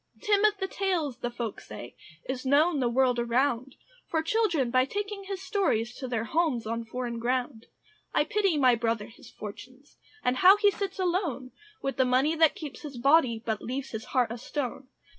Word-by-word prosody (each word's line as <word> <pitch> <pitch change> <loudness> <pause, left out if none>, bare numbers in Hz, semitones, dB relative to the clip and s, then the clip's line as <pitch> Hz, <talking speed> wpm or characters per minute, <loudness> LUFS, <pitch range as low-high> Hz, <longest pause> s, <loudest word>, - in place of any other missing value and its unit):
Tim 415 -1 +2
of 420 -1 +3
the 385 - -2
Tales, 355 -10 -1
the 240 - -2
folk 235 -3 -5
say, 105 +3 -10 0.3
Is 260 -1 -3
known 290 +4 +3
the 245 -2 +1
world 250 0 +2
around, 245 +2 0 0.3
For 320 -1 0
children 330 - +1
by 255 +1 +4
taking 405 +6 -4
his 385 -1 -5
stories 240 - 0
To 260 - -5
their 230 -3 -1
homes 275 -2 0
in 230 +1 -3
foreign 235 0 -4
ground. 245 -1 -2 0.4
I - - +3
pity 390 -1 +1
my 255 -3 +5
brother 225 -2 0
his 230 - -15
fortunes, 255 +7 -11 0.3
And 250 +1 +1
how 375 +8 +8
he 410 -1 +4
sits 395 -1 -4
alone, 345 -9 -1 0.3
With 275 - -2
the 260 - +4
money 260 +5 +3
that 320 -1 +4
keeps 295 -5 -8
his 285 -4 -8
body, 250 -4 +3
But 220 -2 -1
leaves 265 +2 -4
his 220 -1 -5
heart 245 -4 +1
a 235 - -5
stone. 260 0 -4
265 Hz, 190 wpm, -28 LUFS, 240-335 Hz, 0.4 s, how